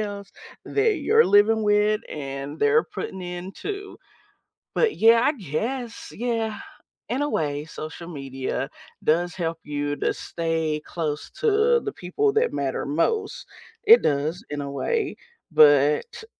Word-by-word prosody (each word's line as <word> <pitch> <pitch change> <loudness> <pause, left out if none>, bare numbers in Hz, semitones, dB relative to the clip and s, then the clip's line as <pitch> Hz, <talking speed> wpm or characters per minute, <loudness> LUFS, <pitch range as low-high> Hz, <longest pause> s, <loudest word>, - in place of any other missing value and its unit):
else 200 -1 -5 0.3
that 420 -1 +1
you're 445 +10 +4
living 215 +2 +4
with 210 +1 +3
and 140 +1 -6
they're 145 +1 +4
putting 190 -1 -6
in 180 +2 -6
too. 400 - -6 0.8
But, 455 -3 +2
yeah, 230 +1 +6
I 285 - +3
guess, 230 - -4
yeah, 225 -2 -2 0.5
in 265 +4 -1
a 290 - 0
way, 145 - -1
social 160 +2 -8
media 135 -2 -4 0.3
does 175 +3 +1
help 165 -2 -3
you 145 0 -2
to - - 0
stay 160 -2 -2
close 155 -3 -4
to 460 +1 +3
the 415 -2 -4
people 410 - 0
that 465 +2 +2
matter 135 -2 -2
most; 415 - -1 0.4
it 450 +3 +8
does 150 +4 0
in 145 0 -3
a 140 - -4
way, 440 - -1 0.3
but, 150 -2 +5
t 445 -2 -10
180 Hz, 145 wpm, -24 LUFS, -, 0.8 s, it